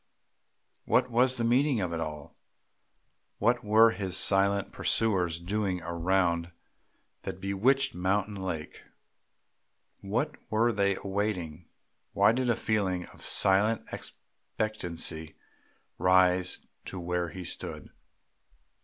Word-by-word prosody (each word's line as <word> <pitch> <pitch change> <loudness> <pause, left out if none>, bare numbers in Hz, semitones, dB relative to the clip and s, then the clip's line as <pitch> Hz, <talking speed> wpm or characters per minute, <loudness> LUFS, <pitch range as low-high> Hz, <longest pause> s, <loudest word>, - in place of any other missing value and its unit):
What - - +2
was 125 +2 +3
the 120 - -1
meaning 125 +2 +2
of 90 -3 -2
it 80 - -2
all? 75 -2 -6 1.0
What 120 +1 +1
were 110 +2 +6
his 95 -2 -2
silent 100 0 +2
pursuers 90 -7 0
doing 95 +1 -2
around 85 0 0 0.7
that - - -6
bewitched 125 +8 +1
mountain 100 +3 0
lake? 95 -6 -5 1.2
What 130 +10 -2
were 115 +2 +2
they 100 -3 +1
awaiting? 95 -5 -3 0.5
Why 100 +2 +5
did 125 +1 0
a 120 - +3
feeling 95 -6 -1
of - - -14
silent 100 +3 +3
expectancy 85 -7 -4 0.6
rise 90 0 +3 0.2
to 95 - -6
where 90 0 -2
he 90 +3 -8
stood? - - -7
95 Hz, 110 wpm, -29 LUFS, 90-110 Hz, 1.2 s, were